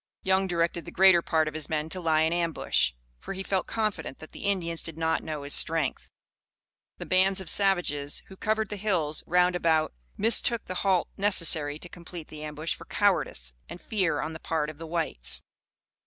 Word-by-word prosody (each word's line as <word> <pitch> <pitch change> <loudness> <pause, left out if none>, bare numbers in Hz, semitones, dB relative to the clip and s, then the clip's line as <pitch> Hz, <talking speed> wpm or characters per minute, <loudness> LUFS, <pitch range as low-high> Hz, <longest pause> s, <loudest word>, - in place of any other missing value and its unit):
Young 190 0 +2
directed 170 -1 -1
the - - -8
greater 190 -2 +6
part 160 -1 +1
of 155 - -3
his 155 -1 -4
men 155 -1 -1
to 185 +2 -3
lie 160 -2 +2
in 160 +1 +2
ambush, 165 - +1 0.3
for - - -6
he 190 0 -5
felt 190 -1 -1
confident 215 -10 -2
that 155 - -12
the - - -8
Indians 170 -5 0
did 165 -1 -4
not 160 0 0
know 155 -2 -5
his 145 - -1
strength. 160 -4 +2 0.9
The - - -7
bands 190 +1 +3
of 190 - 0
savages 175 -8 +1
who 190 - -13
covered 215 +1 -1
the 210 - -5
hills 175 -7 0
round 180 +1 +3
about 160 - +2 0.2
mistook 230 +1 +2
the 185 - -5
halt 190 -3 +2
necessary 165 -7 +3
to 180 - -8
complete 170 -2 -10
the 150 0 -9
ambush 155 +2 -3
for - - -11
cowardice 175 - 0 0.2
and 175 - -8
fear 185 -9 -1
on 155 +2 -4
the 160 - -8
part 155 -2 -2
of 150 - -19
the 165 - -7
whites. 160 - -2
170 Hz, 195 wpm, -27 LUFS, 155-190 Hz, 0.9 s, greater